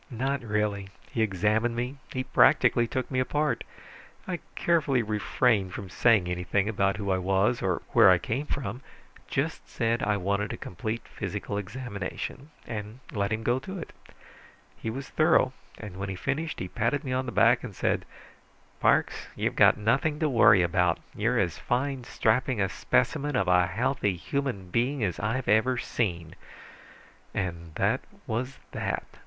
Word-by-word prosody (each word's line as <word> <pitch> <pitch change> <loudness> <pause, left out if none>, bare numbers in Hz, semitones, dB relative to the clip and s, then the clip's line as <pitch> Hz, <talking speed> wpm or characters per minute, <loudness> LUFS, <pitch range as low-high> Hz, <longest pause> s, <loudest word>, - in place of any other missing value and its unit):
"Not 135 +2 -1
really. 105 -3 -1 0.2
He 115 - -1
examined 110 +3 +1
me. 125 +4 -3
He 130 - -2
practically 130 -2 +4
took 130 +3 -3
me 130 - +1
apart. 150 +3 0 0.6
I 180 -2 -2 0.2
carefully 145 -7 +2
refrained 105 -2 +1
from 95 -3 -7
saying 110 -6 +4
anything 90 +3 0
about 100 -2 +1
who 100 -2 -2
I 95 - +2
was 95 +6 +1
or 90 -3 -1
where - - +7
I - - +7
came 135 +7 -3
from; 125 -2 -4 0.5
just - - -2
said 115 +1 0
I 105 0 +1
wanted 100 +2 -1
a - - -6
complete 110 +6 -5
physical - - -5
examination, 105 +5 -5 0.2
and 105 0 -6
let 100 -2 -1
him 110 0 -1
go 120 +3 +2
to 190 +8 -7
it. 170 - -8 0.8
He 115 - -5
was 135 +4 -5
thorough, 155 -5 +3 0.2
and 105 -4 -8
when 100 0 -4
he 95 - -3
finished 150 - -2
he 90 - -3
patted 115 - -1
me 130 -3 -3
on 130 0 -1
the - - -3
back 120 +2 +4
and 110 -6 -7
said, - - 0 0.8
'Parks, - - +2
you've - - -1
got - - +6
nothing 135 +8 +1
to 155 0 +1
worry 115 -7 +6
about. 90 0 +2 0.2
You're - - +1
as - - 0
fine, 130 0 -1
strapping 125 +2 +1
a 95 -1 +2
specimen 145 - 0
of 95 -5 +1
a 90 -1 +4
healthy 105 0 0
human 100 -2 -3
being 125 +4 +1
as 90 -5 -1
I've 115 +5 -1
ever 120 +4 +3
seen.' 85 -9 -2 1.0
And 85 -4 -4
that - - +1 0.2
was 125 +4 -3
that." - - -2
115 Hz, 165 wpm, -28 LUFS, 100-130 Hz, 1.0 s, where